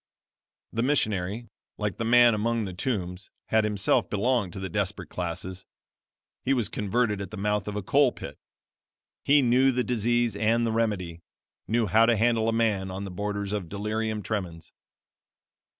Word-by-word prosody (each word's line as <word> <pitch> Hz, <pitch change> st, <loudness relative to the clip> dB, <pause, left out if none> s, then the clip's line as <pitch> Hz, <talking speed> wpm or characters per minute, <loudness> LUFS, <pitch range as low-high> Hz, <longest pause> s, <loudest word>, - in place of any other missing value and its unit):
"The 115 Hz, -, 0 dB
missionary, 110 Hz, -5 st, 0 dB, 0.3 s
like 105 Hz, -4 st, -2 dB
the -, -, -2 dB
man 120 Hz, 0 st, +6 dB
among 115 Hz, +1 st, 0 dB
the 95 Hz, -, -6 dB
tombs, 90 Hz, -3 st, -3 dB, 0.2 s
had 110 Hz, 0 st, +3 dB
himself 105 Hz, -2 st, +1 dB
belonged 105 Hz, -2 st, 0 dB
to -, -, -6 dB
the 95 Hz, -, -4 dB
desperate 95 Hz, -2 st, -2 dB
classes. 90 Hz, +1 st, -5 dB, 0.8 s
He 135 Hz, -, +2 dB
was 120 Hz, -4 st, -1 dB
converted 105 Hz, 0 st, 0 dB
at 95 Hz, -, -6 dB
the 105 Hz, -, -8 dB
mouth 105 Hz, +1 st, -1 dB
of 105 Hz, -, -4 dB
a 105 Hz, -, -3 dB
coal -, -, +4 dB
pit. -, -, -9 dB, 0.8 s
He 145 Hz, 0 st, +5 dB
knew 130 Hz, +2 st, +4 dB
the 125 Hz, 0 st, 0 dB
disease 120 Hz, -1 st, +1 dB
and 115 Hz, +3 st, +2 dB
the 115 Hz, -, 0 dB
remedy 100 Hz, -7 st, -1 dB, 0.5 s
knew 115 Hz, +1 st, +1 dB
how 110 Hz, +4 st, +4 dB
to 120 Hz, -, +4 dB
handle 115 Hz, 0 st, +2 dB
a -, -, +2 dB
man 110 Hz, -4 st, 0 dB
on 95 Hz, +2 st, -5 dB
the 100 Hz, -, -6 dB
borders 100 Hz, +1 st, -3 dB
of 95 Hz, -6 st, -3 dB
delirium 105 Hz, +1 st, -2 dB
tremens. 90 Hz, -7 st, -5 dB
105 Hz, 165 wpm, -27 LUFS, 95-115 Hz, 0.8 s, man